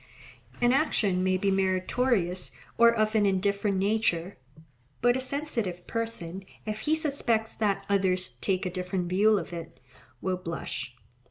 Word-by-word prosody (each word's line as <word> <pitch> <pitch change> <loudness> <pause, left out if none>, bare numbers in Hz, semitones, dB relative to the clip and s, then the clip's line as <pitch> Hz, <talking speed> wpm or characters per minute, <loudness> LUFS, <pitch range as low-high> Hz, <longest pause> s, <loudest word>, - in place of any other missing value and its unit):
An 240 +1 +4
action 205 - +2
may 185 0 +2
be 195 +1 +1
meritorious 190 0 +1 0.2
or 235 0 +7
of 215 -1 +1
an 210 -2 +4
indifferent 200 +1 +1
nature, 195 - 0 0.6
but 245 0 +4
a 260 - -1
sensitive 245 - -2
person, 195 -6 -4 0.2
if 215 0 -3
he 300 +8 +1
suspects 265 -8 0
that 200 -2 0
others 185 -2 +2
take 190 0 -1
a 180 - -2
different 180 0 -2
view 205 +4 +4
of 190 - -5
it, 165 -1 -8 0.4
will 185 +4 -1
blush. 150 -7 -5
195 Hz, 145 wpm, -28 LUFS, 185-225 Hz, 0.6 s, or